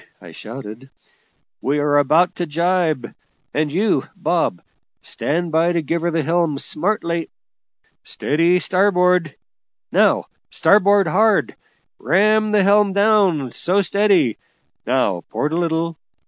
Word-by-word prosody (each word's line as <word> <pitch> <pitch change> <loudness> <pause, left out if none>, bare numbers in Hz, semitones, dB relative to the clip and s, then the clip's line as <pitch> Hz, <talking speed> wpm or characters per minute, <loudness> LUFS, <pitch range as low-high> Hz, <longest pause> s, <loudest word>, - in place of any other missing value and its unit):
I - - -13
shouted; 120 +2 -10 0.7
"we 140 +2 -1
are 145 0 +2
about 165 +6 +2
to 175 - -3
jibe; 165 -5 -1 0.4
and 150 0 -1
you, 195 +6 0
Bob, 175 - -1 0.4
stand 170 +3 -3
by 165 +2 +2
to 170 -2 -1
give 165 +3 -2
her 170 - 0
the 165 -2 -1
helm 165 -2 0
smartly. 170 +1 -2 0.7
Steady 170 +4 0
starboard! 180 -3 +1 0.6
now - - +2 0.2
starboard 200 -1 +3
hard! 210 +5 +1 0.4
ram 215 - +2
the 210 -2 +3
helm 200 0 +3
down! 200 - +2
so, 185 +10 0
steady! 195 - +1 0.5
Now 110 -8 0
port 150 +2 -2
a - - 0
little! 165 -1 -2
170 Hz, 120 wpm, -19 LUFS, 150-195 Hz, 0.7 s, starboard